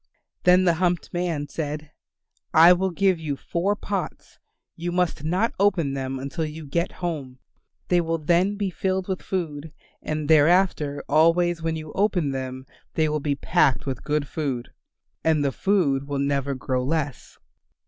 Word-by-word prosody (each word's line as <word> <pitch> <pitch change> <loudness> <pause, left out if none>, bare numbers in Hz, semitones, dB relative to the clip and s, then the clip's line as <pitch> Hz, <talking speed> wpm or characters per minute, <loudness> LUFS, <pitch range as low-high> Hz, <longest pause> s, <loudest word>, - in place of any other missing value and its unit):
Then 180 +1 +6
the 175 -2 +4
humped 175 -3 0
man 170 -5 -1
said, 150 0 -5 0.6
"I 165 +3 +9
will 190 +2 0
give 185 0 +1
you 150 -3 -3
four 180 +8 -1
pots. 195 -5 -5 0.4
You 175 +1 -4
must 180 -4 0
not 185 +8 +1
open 185 -8 +2
them 135 -1 -3
until 140 +5 -4
you 155 0 -6
get 170 +5 -1
home. 140 -7 -4 0.5
They 175 -1 +3
will 165 0 -1
then 175 +6 +2
be 200 -2 -2
filled 190 +1 -1
with 190 -2 -3
food, 160 -5 -4 0.3
and 155 -1 -3
thereafter 155 -2 +3
always 165 +3 +3
when 165 0 -1
you 155 -1 -7
open 185 -7 +1
them 130 -1 -5 0.3
they 160 -1 +2
will 150 0 0
be 145 -1 -1
packed 140 -1 +2
with 135 -3 -4
good 150 -1 -1
food. 135 -5 -3 0.5
And 155 -3 +2
the 140 - +1
food 140 -7 +1
will 145 -1 -2
never 140 0 0
grow 130 0 -2
less." 145 -2 -3
160 Hz, 160 wpm, -24 LUFS, 145-180 Hz, 0.6 s, I